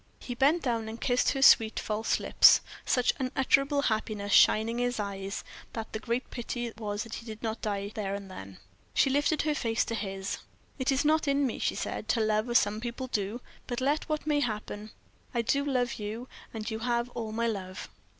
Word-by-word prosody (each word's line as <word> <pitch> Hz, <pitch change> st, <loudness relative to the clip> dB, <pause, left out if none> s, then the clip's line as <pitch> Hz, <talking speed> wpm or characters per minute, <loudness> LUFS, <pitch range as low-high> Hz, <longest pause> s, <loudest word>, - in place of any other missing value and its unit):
He 245 Hz, -, -5 dB
bent 290 Hz, +7 st, +3 dB
down 230 Hz, -4 st, -1 dB
and 225 Hz, +1 st, -7 dB
kissed 250 Hz, -1 st, +2 dB
her 270 Hz, -1 st, 0 dB
sweet, 225 Hz, -4 st, +6 dB
false 215 Hz, +1 st, 0 dB
lips, -, -, +6 dB, 0.3 s
such 250 Hz, -1 st, +3 dB
unutterable 275 Hz, +2 st, +2 dB
happiness 215 Hz, -3 st, -1 dB
shining 225 Hz, +2 st, +5 dB
in 245 Hz, -, +2 dB
his 245 Hz, -2 st, -2 dB
eyes 200 Hz, -1 st, -4 dB, 0.3 s
that 225 Hz, -1 st, -6 dB
the 220 Hz, -, -2 dB
great 235 Hz, +3 st, -3 dB
pity 240 Hz, -1 st, -4 dB
was 205 Hz, -1 st, -3 dB
he 230 Hz, 0 st, -7 dB
did 220 Hz, -1 st, -9 dB
not 220 Hz, 0 st, -3 dB
die 200 Hz, -2 st, -2 dB
there 200 Hz, -2 st, -2 dB
and 200 Hz, -1 st, -8 dB
then. 95 Hz, -, -9 dB, 0.4 s
She 270 Hz, -, +4 dB
lifted 290 Hz, +2 st, +2 dB
her 305 Hz, 0 st, +1 dB
face 230 Hz, -5 st, 0 dB
to -, -, -4 dB
his. 195 Hz, -3 st, -3 dB, 0.4 s
"It 260 Hz, +1 st, +1 dB
is 270 Hz, +2 st, +1 dB
not 310 Hz, 0 st, +3 dB
in 280 Hz, 0 st, +2 dB
me," 250 Hz, -, -2 dB
she -, -, 0 dB
said, -, -, -4 dB
"to 235 Hz, -, +2 dB
love 215 Hz, +1 st, +1 dB
as 240 Hz, -, +5 dB
some 210 Hz, 0 st, +1 dB
people 245 Hz, +2 st, -5 dB
do; 210 Hz, +2 st, -2 dB, 0.3 s
but, 245 Hz, -1 st, -2 dB
let 285 Hz, +5 st, 0 dB
what 305 Hz, 0 st, -1 dB
may 300 Hz, -1 st, +2 dB
happen, 215 Hz, -4 st, -3 dB, 0.5 s
I 235 Hz, -, +2 dB
do 280 Hz, +5 st, +1 dB
love 250 Hz, -4 st, 0 dB
you, 220 Hz, +4 st, -5 dB, 0.2 s
and 215 Hz, -2 st, -6 dB
you 220 Hz, -, -3 dB
have 240 Hz, +1 st, 0 dB
all 225 Hz, -3 st, -4 dB
my 230 Hz, +2 st, -1 dB
love." 190 Hz, -5 st, -4 dB
230 Hz, 205 wpm, -29 LUFS, 215-260 Hz, 0.5 s, sweet